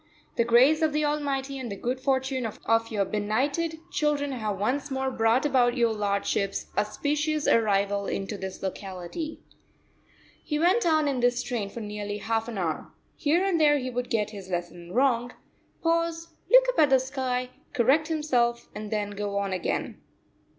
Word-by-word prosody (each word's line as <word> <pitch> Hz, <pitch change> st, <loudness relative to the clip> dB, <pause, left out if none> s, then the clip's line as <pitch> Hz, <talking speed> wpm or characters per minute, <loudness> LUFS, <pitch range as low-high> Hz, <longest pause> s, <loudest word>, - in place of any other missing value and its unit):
the 235 Hz, -, +3 dB
grace 255 Hz, +7 st, +5 dB
of 315 Hz, -2 st, +2 dB
the 300 Hz, 0 st, +1 dB
Almighty 280 Hz, -2 st, -1 dB
and 245 Hz, -4 st, -5 dB
the -, -, -3 dB
good 250 Hz, +5 st, -2 dB
fortune 265 Hz, -1 st, 0 dB
of 215 Hz, -, -9 dB, 0.3 s
your 205 Hz, -2 st, +1 dB
benighted 270 Hz, -, -1 dB
children 295 Hz, -3 st, 0 dB
have 215 Hz, -6 st, -2 dB
once 265 Hz, +8 st, -1 dB
more 265 Hz, -1 st, -1 dB
brought 230 Hz, +3 st, +2 dB
about 255 Hz, -3 st, +3 dB
your 235 Hz, -2 st, +3 dB
lordship's 200 Hz, -1 st, -1 dB
auspicious 295 Hz, +8 st, 0 dB
arrival 200 Hz, -2 st, +2 dB
into 195 Hz, +2 st, -3 dB
this 190 Hz, -1 st, -7 dB
locality." 190 Hz, -, -5 dB, 1.0 s
He 300 Hz, -, -2 dB
went 355 Hz, +6 st, +3 dB
on 310 Hz, -2 st, +3 dB
in 270 Hz, -3 st, 0 dB
this 245 Hz, 0 st, +2 dB
strain 230 Hz, -6 st, -3 dB
for 230 Hz, -, -7 dB
nearly 210 Hz, -1 st, -4 dB
half 225 Hz, +2 st, -1 dB
an 230 Hz, -3 st, -5 dB
hour. 170 Hz, -4 st, -2 dB, 0.2 s
Here 335 Hz, +4 st, +2 dB
and 355 Hz, -5 st, +1 dB
there 295 Hz, -1 st, +5 dB
he 255 Hz, -2 st, -3 dB
would 245 Hz, 0 st, -3 dB
get 210 Hz, -2 st, 0 dB
his 195 Hz, -3 st, -9 dB
lesson 175 Hz, -1 st, -5 dB
wrong, 245 Hz, 0 st, +2 dB, 0.5 s
pause, 335 Hz, 0 st, 0 dB, 0.2 s
look -, -, +8 dB
up -, -, 0 dB
at 300 Hz, -2 st, +6 dB
the 265 Hz, -1 st, +5 dB
sky, 255 Hz, -1 st, -2 dB, 0.2 s
correct 270 Hz, +6 st, +3 dB
himself, 250 Hz, -7 st, 0 dB
and 210 Hz, 0 st, -6 dB
then 210 Hz, -1 st, -2 dB
go 200 Hz, 0 st, -3 dB
on 200 Hz, -1 st, -1 dB
again. 185 Hz, -, -3 dB
250 Hz, 170 wpm, -27 LUFS, 210-295 Hz, 1.0 s, look